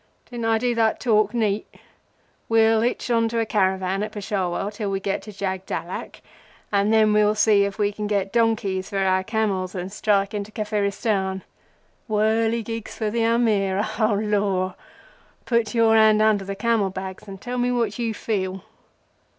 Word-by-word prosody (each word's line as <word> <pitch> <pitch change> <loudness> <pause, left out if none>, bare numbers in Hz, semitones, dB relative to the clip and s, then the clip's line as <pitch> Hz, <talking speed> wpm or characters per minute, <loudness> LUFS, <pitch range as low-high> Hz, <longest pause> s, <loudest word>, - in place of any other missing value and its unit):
Didn't 235 -2 -4
I 225 0 +3
do 245 +1 0
that 225 -2 +1
talk 215 -3 +2
neat? 215 -3 -1 0.8
We'll 225 -1 +4
hitch 240 +1 -1
on 230 -1 +2
to 230 0 -1
a 225 - +1
caravan 190 -2 0
at 210 0 -3
Peshawar 195 -1 -2
till 205 -1 -4
we 195 0 -1
get 195 0 -2
to 210 - -10
Jagdallak, 190 -1 -5 0.5
and 200 +1 +2
then 215 -1 +4
we'll 210 0 +3
see 210 -2 +4
if 200 -1 -5
we 205 -1 +1
can 210 0 -4
get 200 -1 -1
donkeys 220 -5 +1
for 200 - -3
our 190 -1 +2
camels, 195 -4 -1
and 185 +1 -5
strike 205 -1 +1
into 205 0 -4
Kafiristan. 200 -3 -1 0.7
Whirligigs 225 +1 0
for 215 -2 -2
the 230 +1 0
Amir, 215 -4 +2
O 215 -2 +2
Lor! 200 -3 0 0.7
Put 235 -2 0
your 225 -1 +4
hand 220 -1 +5
under 215 -2 +3
the 195 0 -4
camel 220 -1 +1
bags 190 +1 -7
and 195 -1 -9
tell 250 +3 -4
me 245 0 +1
what 235 -3 -1
you 230 -2 -1
feel." 190 -3 -3
210 Hz, 165 wpm, -23 LUFS, 195-225 Hz, 0.8 s, hand